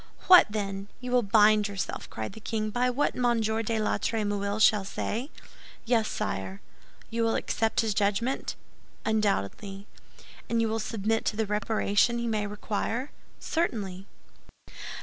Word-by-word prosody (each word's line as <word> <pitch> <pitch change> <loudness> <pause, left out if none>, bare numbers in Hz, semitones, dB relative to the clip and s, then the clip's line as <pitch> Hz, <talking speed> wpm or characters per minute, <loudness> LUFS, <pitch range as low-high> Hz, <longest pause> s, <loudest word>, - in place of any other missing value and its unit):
"What, 365 -1 +9
then! 195 -2 -3
You 250 0 -6
will 250 0 +4
bind 210 0 +5
yourself," 200 -1 -4
cried 110 -1 -5
the - - -10
king, 215 -1 -2
"by 245 +3 +1
what 260 +4 +1
Monsieur 225 -3 +1
de 225 0 -1
la 215 - 0
Trémouille 205 -2 -1
shall 210 -2 +5
say?" 230 +6 -3 0.6
"Yes, 230 -2 +2
sire." 95 0 -3 0.5
"You 230 +1 -1
will 225 0 +2
accept 225 -1 0
his 220 -2 0
judgment?" 210 +6 0 0.5
"Undoubtedly." 200 - -1 0.6
"And 230 - +1
you 230 - +2
will 225 +1 -1
submit 220 0 -1
to - - 0
the 220 0 0
reparation 210 +2 +1
he 235 - -2
may 215 -2 -1
require?" 220 +5 -3 0.3
"Certainly." 200 - -2
215 Hz, 145 wpm, -28 LUFS, 205-230 Hz, 0.6 s, What